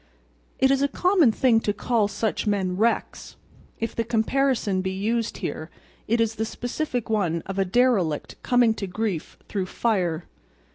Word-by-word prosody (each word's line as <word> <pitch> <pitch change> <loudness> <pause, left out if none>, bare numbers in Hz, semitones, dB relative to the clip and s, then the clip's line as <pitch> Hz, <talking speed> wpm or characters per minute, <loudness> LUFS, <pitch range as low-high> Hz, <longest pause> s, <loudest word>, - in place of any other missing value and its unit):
It 265 0 +4
is 275 0 +2
a 280 - +3
common 360 - +3
thing 230 0 +3
to 210 -2 -1
call 220 0 +1
such 215 +1 -2
men 190 -3 0
wrecks; 225 +5 -1 0.4
if 225 - -3
the 230 - 0
comparison 230 -3 +1
be 190 - -2
used 220 +4 -1
here 155 +1 -5 0.4
it 230 +2 +2
is 225 -1 +2
the 220 - -2
specific 245 +2 -3
one 180 -7 0
of 195 0 -4
a 195 - +3
derelict 190 -7 +1
come 245 -3 +3
to 200 -2 -5
grief 190 -3 -3
through 190 -3 -2
fire. 180 -7 0
220 Hz, 160 wpm, -24 LUFS, 190-240 Hz, 0.4 s, It